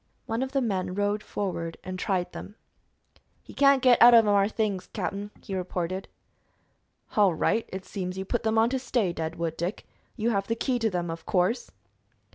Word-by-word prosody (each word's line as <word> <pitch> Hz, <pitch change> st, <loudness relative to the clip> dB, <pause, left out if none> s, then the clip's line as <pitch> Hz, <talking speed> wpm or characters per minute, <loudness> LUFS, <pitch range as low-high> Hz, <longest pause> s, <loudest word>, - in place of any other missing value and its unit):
One 225 Hz, +2 st, -2 dB
of 265 Hz, 0 st, -2 dB
the 275 Hz, 0 st, +1 dB
men 190 Hz, -6 st, -1 dB
rode 205 Hz, +1 st, 0 dB
forward 170 Hz, -6 st, -4 dB
and 185 Hz, 0 st, -6 dB
tried 185 Hz, -2 st, -1 dB
them. 205 Hz, -, -9 dB, 0.9 s
"He -, -, -13 dB
can't 275 Hz, -2 st, +4 dB
git 250 Hz, -2 st, +5 dB
out 240 Hz, 0 st, +10 dB
of 225 Hz, -1 st, +7 dB
them 205 Hz, -, +3 dB
'ar 200 Hz, 0 st, +3 dB
things, 205 Hz, -4 st, -2 dB
cap'n," 200 Hz, +1 st, -4 dB
he 200 Hz, -, -6 dB
reported. 185 Hz, 0 st, -3 dB, 1.1 s
"All 200 Hz, -5 st, +4 dB
right. 225 Hz, +7 st, 0 dB
It 190 Hz, 0 st, -6 dB
seems 185 Hz, -1 st, -5 dB
you 190 Hz, -, -4 dB
put 240 Hz, +4 st, -1 dB
them 220 Hz, -1 st, 0 dB
on 225 Hz, +2 st, +4 dB
to 265 Hz, -, 0 dB
stay, 230 Hz, -8 st, 0 dB
Deadwood 165 Hz, 0 st, -3 dB
Dick. 175 Hz, +5 st, -3 dB, 0.3 s
You 230 Hz, 0 st, 0 dB
have 195 Hz, -2 st, -1 dB
the 230 Hz, -, 0 dB
key 245 Hz, +1 st, -1 dB
to 225 Hz, -1 st, +1 dB
them, 175 Hz, -3 st, -2 dB
of 165 Hz, -, -8 dB
course." 195 Hz, +7 st, +1 dB
200 Hz, 195 wpm, -27 LUFS, 185-230 Hz, 1.1 s, out